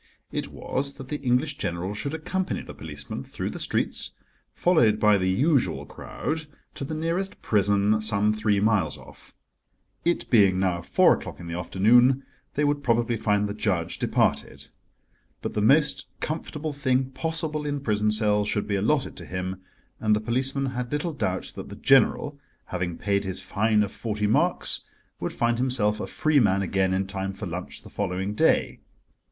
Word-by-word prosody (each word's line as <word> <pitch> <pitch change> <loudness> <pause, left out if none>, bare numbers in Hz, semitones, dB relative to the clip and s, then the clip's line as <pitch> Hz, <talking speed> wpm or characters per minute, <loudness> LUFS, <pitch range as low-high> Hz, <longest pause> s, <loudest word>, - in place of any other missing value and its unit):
It - - -3
was 140 +1 -3
that 135 -2 -10
the 150 - -2
English 130 +3 +1
General 85 +3 -2
should 140 +9 -3
accompany 185 +4 -2
the - - -9
policeman - - -7
through - - -5
the - - -7
streets, - - -1 0.4
followed 120 -12 +3
by 105 -1 +5
the 95 0 +1
usual 135 - +1
crowd, 160 0 -5 0.3
to - - -6
the 155 +3 -4
nearest 170 +5 -2
prison, 100 +1 +2
some 105 0 +3
three 110 -1 +1
miles 105 -1 +1
off. - - -16 0.7
It 170 0 0
being 100 -6 +5
now 90 -2 0
four - - +4
o'clock - - -6
in 85 - -8
the 85 - -5
afternoon, 120 +9 +4 0.3
they 150 - +1
would 145 0 +1
probably 120 -2 +1
find 105 -2 +1
the 100 - -4
judge 90 -6 -1
departed. - - 0 0.7
But - - -3
the 105 - 0
most 140 +5 +3
comfortable 155 -1 -4
thing 130 -2 0
possible 155 +2 -2
in 145 -1 -2
prison 105 -5 +1
cells 105 -1 +2
should 105 - -1
be 100 - 0
allotted 130 +8 +1
to - - -7
him, 90 +1 -4 0.4
and 110 -1 +3
the - - 0
policeman 130 +4 0
had 125 -1 -4
little 150 +3 -1
doubt 95 -10 -2
that - - -7
the - - -8
General, 140 +2 +3 0.3
having 90 -2 -3
paid 100 0 0
his 95 -1 -3
fine 110 0 +1
of 100 - -4
forty 105 -2 -3
marks, 105 - +1 0.4
would - - -3
find 120 0 0
himself 115 -5 +2
a - - -4
free 155 -2 +2
man 100 -4 +3
again 95 0 +1
in 95 +1 0
time 95 0 -4
for 100 +2 -6
lunch 90 0 -6
the - - -12
following 95 0 -2
day. - - +2
110 Hz, 175 wpm, -26 LUFS, 100-140 Hz, 0.7 s, by